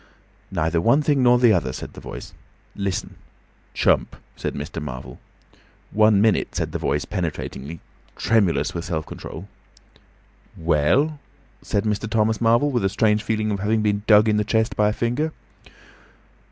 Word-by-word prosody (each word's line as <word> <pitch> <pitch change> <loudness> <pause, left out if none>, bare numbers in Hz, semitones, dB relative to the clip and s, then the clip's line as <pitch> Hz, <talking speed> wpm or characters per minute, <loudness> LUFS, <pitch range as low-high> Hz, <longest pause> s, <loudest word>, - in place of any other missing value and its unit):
"Neither 85 -2 0
one 135 - +3
thing 145 -2 +2
nor 125 -1 +5
the 120 -3 +5
other," 70 -9 0
said - - -8
the - - -11
Voice. - - -9 0.4
"Listen!" 100 -3 -3 0.6
"Chump," - - +2 0.2
said - - -4
Mr. 75 +3 -5
Marvel. 65 -4 -7 0.7
"One 105 -1 +4
minute," 110 0 +2
said - - -2
the - - -3
Voice, 75 +2 -1
penetratingly, 80 -4 -5 0.3
tremulous 105 -6 +1
with 85 - -4
self 80 -3 -3
control. 90 +5 -9 1.1
"Well?" 85 - +2 0.4
said 100 - -1
Mr. 105 +1 -2
Thomas 110 0 +1
Marvel, 120 +5 +3
with 120 -5 0
a 95 - +2
strange 105 +1 +2
feeling 110 -1 -1
of 100 - -2
having 105 +2 +1
been 105 -1 +1
dug 105 0 +6
in 105 -1 +2
the 105 - +2
chest 110 +1 0
by 105 0 +3
a - - -1
finger. 125 +8 -1
105 Hz, 155 wpm, -22 LUFS, 85-115 Hz, 1.1 s, dug